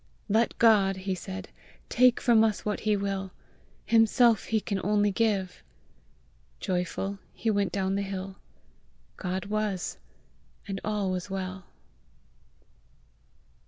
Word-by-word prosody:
"Let 225 Hz, +3 st, +2 dB
God," 200 Hz, -4 st, +4 dB
he 190 Hz, 0 st, -2 dB
said, 190 Hz, +1 st, -7 dB, 0.4 s
"take 250 Hz, 0 st, +4 dB
from 230 Hz, -2 st, +5 dB
us 215 Hz, -3 st, 0 dB
what 210 Hz, -1 st, -1 dB
he 215 Hz, -1 st, +1 dB
will: 195 Hz, -1 st, -2 dB, 0.6 s
himself 225 Hz, +1 st, +4 dB
he 220 Hz, -, +1 dB
can 200 Hz, -2 st, -3 dB
only 205 Hz, +1 st, +2 dB
give!" 195 Hz, -3 st, 0 dB, 1.0 s
Joyful 190 Hz, +1 st, -2 dB, 0.2 s
he 225 Hz, -, 0 dB
went 200 Hz, -2 st, +1 dB
down 190 Hz, -1 st, -1 dB
the 200 Hz, -, 0 dB
hill. 195 Hz, -1 st, -5 dB, 0.8 s
God 185 Hz, +1 st, -3 dB
was, 210 Hz, -3 st, -2 dB, 0.7 s
and 195 Hz, -1 st, -4 dB
all 205 Hz, -3 st, -1 dB
was 185 Hz, +1 st, -3 dB
well! 185 Hz, -1 st, -5 dB
200 Hz, 120 wpm, -28 LUFS, 190-215 Hz, 1.0 s, from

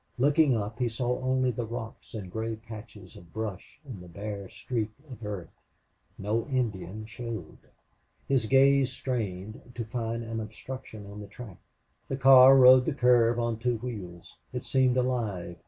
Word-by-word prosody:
Looking 140 Hz, 0 st, +4 dB
up, 105 Hz, +2 st, -4 dB
he 125 Hz, -2 st, +1 dB
saw 125 Hz, +2 st, -2 dB
only 130 Hz, 0 st, +1 dB
the 120 Hz, -1 st, -4 dB
rocks 115 Hz, 0 st, -7 dB
and 95 Hz, -5 st, -6 dB
gray 110 Hz, +2 st, -3 dB
patches 110 Hz, -3 st, -11 dB
of 85 Hz, -1 st, -14 dB
brush 110 Hz, -3 st, -6 dB
and 120 Hz, -10 st, -8 dB
the 90 Hz, -, -11 dB
bare 100 Hz, +2 st, -6 dB
streak 115 Hz, -4 st, -3 dB, 0.2 s
of 120 Hz, -2 st, -10 dB
earth. 100 Hz, -5 st, -5 dB, 0.7 s
No 110 Hz, +3 st, -1 dB
Indian 110 Hz, -, -2 dB
showed. 115 Hz, +1 st, -7 dB, 0.7 s
His 130 Hz, -5 st, +1 dB
gaze 135 Hz, +1 st, +5 dB
strained 110 Hz, -6 st, -4 dB
to 115 Hz, -, -3 dB
find 115 Hz, 0 st, -3 dB
an 115 Hz, 0 st, -4 dB
obstruction 110 Hz, 0 st, -8 dB
on 100 Hz, +1 st, -9 dB
the 105 Hz, -, -8 dB
track. 105 Hz, -2 st, -11 dB, 0.5 s
The 135 Hz, -, -3 dB
car 135 Hz, 0 st, +9 dB
rode 130 Hz, 0 st, +8 dB
the 155 Hz, -, -1 dB
curve 120 Hz, -2 st, +4 dB
on 115 Hz, -2 st, -1 dB
two 120 Hz, 0 st, 0 dB
wheels. 100 Hz, -8 st, -8 dB, 0.2 s
It 125 Hz, 0 st, -5 dB
seemed 130 Hz, -1 st, +2 dB
alive. 110 Hz, -9 st, -1 dB
115 Hz, 160 wpm, -28 LUFS, 105-125 Hz, 0.7 s, car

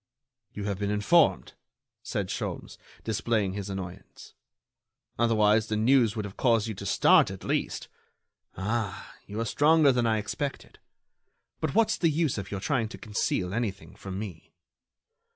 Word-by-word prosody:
"You 105 Hz, -, -6 dB
have 100 Hz, -1 st, -2 dB
been 100 Hz, -1 st, -1 dB
informed," 125 Hz, +11 st, +3 dB, 0.5 s
said -, -, -3 dB
Sholmes, -, -, -5 dB, 0.2 s
displaying 110 Hz, -2 st, 0 dB
his 100 Hz, 0 st, -5 dB
annoyance. 95 Hz, -1 st, -8 dB, 0.9 s
"Otherwise, 110 Hz, -2 st, +3 dB
the 110 Hz, -, -1 dB
news 115 Hz, -1 st, +3 dB
would 105 Hz, -2 st, -3 dB
have 100 Hz, -, -9 dB
caused 115 Hz, -4 st, +3 dB
you 110 Hz, -, -3 dB
to 100 Hz, 0 st, -7 dB
start, -, -, +5 dB
at -, -, -8 dB
least. -, -, -2 dB, 0.7 s
Ah! 100 Hz, 0 st, -3 dB
you 105 Hz, +2 st, -5 dB
are 115 Hz, -, 0 dB
stronger 150 Hz, +3 st, +4 dB
than 120 Hz, -2 st, +1 dB
I 110 Hz, -1 st, +2 dB
expected. 130 Hz, +6 st, -5 dB, 0.8 s
But 155 Hz, +2 st, -2 dB
what's 225 Hz, -1 st, +3 dB
the 165 Hz, -, +3 dB
use 155 Hz, -6 st, 0 dB
of 95 Hz, -, -7 dB
your 100 Hz, -, -4 dB
trying 115 Hz, 0 st, 0 dB
to -, -, -9 dB
conceal 95 Hz, -4 st, -2 dB
anything 100 Hz, -6 st, -3 dB
from 95 Hz, -1 st, -7 dB
me?" 100 Hz, -6 st, -8 dB
110 Hz, 150 wpm, -28 LUFS, 100-120 Hz, 0.9 s, start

